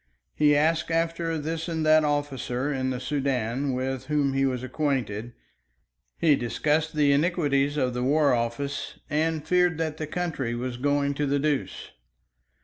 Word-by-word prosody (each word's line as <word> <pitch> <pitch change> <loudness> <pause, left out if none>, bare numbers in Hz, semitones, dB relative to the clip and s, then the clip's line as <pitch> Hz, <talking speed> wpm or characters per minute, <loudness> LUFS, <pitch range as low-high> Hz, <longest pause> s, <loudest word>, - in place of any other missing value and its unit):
He 150 -1 +4
asked 160 +3 +2
after 165 0 0
this 160 +2 -3
and 160 -1 -1
that 155 0 +5
officer 145 -2 -1
in 130 -1 -1
the 130 -1 -2
Soudan 135 -2 -1
with 130 0 -3
whom 145 -2 +1
he 135 0 +2
was 125 -1 -2
acquainted, 130 -5 -2 0.9
he 160 -4 +4
discussed 150 +6 0
the 145 -2 +4
iniquities 145 -2 +1
of 125 -3 +1
the 125 - -2
War 140 +1 +3
Office, 120 +4 -3
and 155 0 0
feared 180 -2 +3
that 160 -2 -2
the 155 - -4
country 150 -8 -2
was 125 0 -4
going 140 +1 +1
to 145 +1 -1
the 140 +1 +1
deuce. 145 -1 -2
145 Hz, 155 wpm, -26 LUFS, 130-155 Hz, 0.9 s, that